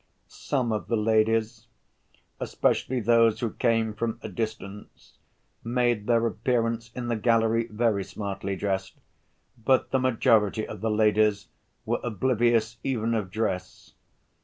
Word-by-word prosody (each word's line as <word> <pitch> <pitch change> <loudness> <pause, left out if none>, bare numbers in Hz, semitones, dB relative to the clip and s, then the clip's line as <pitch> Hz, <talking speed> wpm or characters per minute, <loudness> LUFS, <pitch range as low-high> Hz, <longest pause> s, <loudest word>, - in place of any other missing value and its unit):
Some 125 -5 -2
of 105 -3 -2
the 115 - 0
ladies, 110 +1 +1 0.7
especially 130 -1 0
those 115 0 +4
who 115 -3 -2
came 115 -2 +1
from 115 +1 -3
a - - -5
distance, 110 -3 -7 0.4
made 120 -3 0
their 115 -1 +3
appearance 115 -2 -1
in 125 -1 -4
the 120 - 0
gallery 115 0 +2
very 110 -2 0
smartly 100 -1 -5
dressed, 95 -1 -3 0.7
but 130 +2 +2
the 130 - +2
majority 110 -4 +2
of - - -8
the 110 - 0
ladies 105 -2 +2 0.4
were - - 0
oblivious 120 0 +1
even 115 -3 -1
of 105 -5 -2
dress. 95 -3 -4
115 Hz, 130 wpm, -26 LUFS, 105-120 Hz, 0.7 s, those